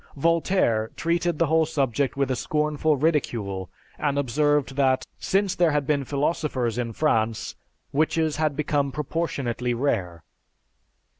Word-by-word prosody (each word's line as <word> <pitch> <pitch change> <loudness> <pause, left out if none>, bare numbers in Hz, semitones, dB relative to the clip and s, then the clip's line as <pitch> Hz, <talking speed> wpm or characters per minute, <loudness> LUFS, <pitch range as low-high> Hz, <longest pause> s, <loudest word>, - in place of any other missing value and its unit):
Voltaire 165 - +2
treated 170 0 0
the 170 - +3
whole 160 0 +2
subject 140 -3 0
with 140 -1 +1
a - - +1
scornful 150 +2 0
ridicule 115 - -1 0.3
and 145 -2 0
observed 145 +1 +1
that, 135 -2 +2
"Since 195 -1 +1
there 175 -2 +3
had 145 -1 +1
been 140 -1 0
philosophers 140 -4 -1
in 120 -1 -2
France, 115 -7 0 0.4
witches 155 +1 +1
had 155 -2 0
become 145 -2 0
proportionately 135 -5 -2
rare." 95 - -1
145 Hz, 130 wpm, -25 LUFS, 125-155 Hz, 0.4 s, the